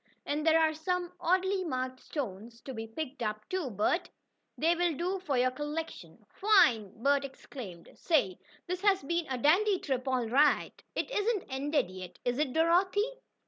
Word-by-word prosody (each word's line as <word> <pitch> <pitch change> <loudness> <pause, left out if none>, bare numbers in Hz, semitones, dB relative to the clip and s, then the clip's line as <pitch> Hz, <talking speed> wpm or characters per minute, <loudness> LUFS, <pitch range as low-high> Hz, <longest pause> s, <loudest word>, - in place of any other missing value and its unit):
"And 295 +1 -1
there 320 0 +6
are 315 -1 +3
some 355 +3 -2
oddly 375 +2 +1
marked 255 -5 -3
stones 230 -5 -6
to 265 - -7
be 225 -1 -5
picked 260 +3 -6
up, 215 -1 -3
too, 370 -7 -2
Bert. 220 - 0 0.5
They 330 +2 +3
will 345 -2 +1
do 365 +6 -1
for 300 -8 -1
your 255 +1 +3
collection." 295 +4 -6
"Fine!" 240 - +3
Bert 280 0 +3
exclaimed. 245 -9 -9
"Say, 210 - +1 0.3
this 365 +1 -3
has 395 -6 +3
been 340 +3 -1
a 260 - -1
dandy 370 - +4
trip 265 -5 -3
all 255 -2 +1
right!" 285 +6 +2
"It - - -2
isn't 420 -3 0
ended 275 - 0
yet, 185 -1 -9
is 245 +2 0
it, 300 -4 +1
Dorothy?" 370 - +2
295 Hz, 170 wpm, -31 LUFS, 250-355 Hz, 0.5 s, there